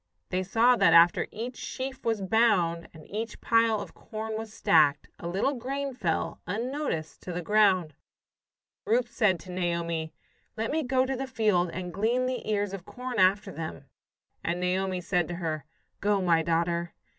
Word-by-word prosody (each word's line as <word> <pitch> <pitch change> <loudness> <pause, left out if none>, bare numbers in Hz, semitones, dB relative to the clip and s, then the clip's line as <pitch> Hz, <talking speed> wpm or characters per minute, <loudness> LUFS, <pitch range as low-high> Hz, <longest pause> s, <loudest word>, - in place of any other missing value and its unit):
They 185 - 0
saw 225 +6 +4
that - - +5
after 170 +1 +6
each 240 +3 -6
sheaf 260 0 -5
was 225 -3 0
bound, 185 -6 +2
and 155 -2 -14
each 220 +2 -5
pile 230 -2 +3
of - - -8
corn 220 0 -6
was 220 0 -5
stacked, 155 -8 +3
a 170 - -5
little 195 +11 0
grain 275 +2 -3
fell, 175 -10 -2
unnoticed, 230 - -3
to 180 - -6
the 175 0 -4
ground. 190 -5 +3 0.9
Ruth 240 +2 +1
said 210 -7 +2
to 185 - -10
Naomi: 170 -3 -2 0.5
"Let 225 +1 -1
me 315 +2 +1
go 260 -1 +2
to 265 0 -2
the 265 +1 -4
field 210 -8 +2
and 180 0 -5
glean 235 +6 +1
the 255 -3 -3
ears 205 -2 0
of 195 -3 -6
corn 250 +4 -5
after 195 +2 +3
them." 160 -2 -6 0.6
And 170 +1 -1
Naomi 185 0 0
said 175 -2 0
to 175 - -4
her, 155 -4 -3 0.3
"Go, 205 0 +2
my 170 -3 +3
daughter." 170 +1 0
195 Hz, 170 wpm, -28 LUFS, 175-230 Hz, 0.9 s, after